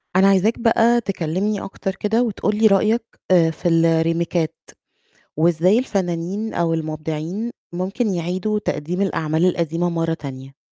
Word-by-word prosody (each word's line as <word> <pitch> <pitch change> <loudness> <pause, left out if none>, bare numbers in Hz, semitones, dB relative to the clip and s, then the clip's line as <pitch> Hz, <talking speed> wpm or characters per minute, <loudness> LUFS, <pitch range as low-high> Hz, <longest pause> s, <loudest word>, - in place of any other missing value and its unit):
أنا 190 +1 +5
عايزاك 195 +3 +3
بقى 235 0 +3
تكلمني 195 +1 -2
أكتر 195 0 -5
كده، 220 +4 +1
وتقول 210 -2 -1
لي 220 +1 +5
رأيك 215 +3 +3 0.3
آآ 170 -3 +5
في 170 +3 -4
الريميكات 165 0 +1 0.8
وإزاي 170 +6 +3
الفنانين، 195 -2 -2
أو 165 -1 +1
المبدعين، 160 +6 -4 0.2
ممكن 195 +4 -1
يعيدوا 180 +5 -1
تقديم 180 -2 -3
الأعمال 160 -4 0
القديمة 170 -1 0
مرة 165 -1 -1
تانية؟ 135 -2 -9
180 Hz, 130 wpm, -21 LUFS, 165-210 Hz, 0.8 s, أنا